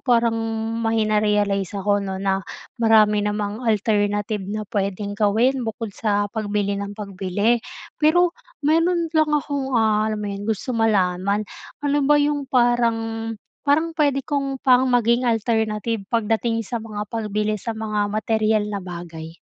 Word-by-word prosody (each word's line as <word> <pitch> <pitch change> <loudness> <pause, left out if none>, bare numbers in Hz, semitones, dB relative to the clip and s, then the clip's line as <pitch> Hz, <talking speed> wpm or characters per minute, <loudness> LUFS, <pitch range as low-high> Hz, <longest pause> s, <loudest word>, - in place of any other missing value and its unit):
parang 235 -2 +2 0.5
may 225 -1 +1
na-realize 210 -2 +1
ako, 205 +1 +1
'no, 190 -1 -4
na 195 0 0 0.4
marami 215 -2 +5
namang 210 +1 -2
alternative 210 -1 0
na 215 +1 -3
pwedeng 200 0 -2
gawin 225 +6 +2
bukod 225 -2 -4
sa 205 -1 0
pagbili 205 -2 -1
ng 200 0 -6
pagbili. 205 +3 0 0.4
Pero 340 +3 +4 0.3
meron 330 +2 +2
lang 310 -1 +3
akong 280 -3 -1
ah, 215 -1 +2
alam 210 -1 -3
mo - - -2
'yon, 200 +2 -6
gusto 220 +4 -2
malaman. 200 -2 +1 0.4
Ano 290 0 +2
ba 295 - +6
'yong 290 -1 0
parang 240 -2 +3 0.6
parang 315 +4 +2
pwede 285 -4 +1
kong 275 -2 -2
pang 255 0 +5
maging 240 0 +2
alternative 220 -1 0
pagdating 225 0 0
sa 235 +2 -4
mga 210 -2 -5
pagbili 215 -1 -2
sa 230 -2 -4
mga 210 -2 -1
materyal 215 0 +1
na 200 - -2
bagay? 170 -2 -8
220 Hz, 140 wpm, -22 LUFS, 205-245 Hz, 0.6 s, ba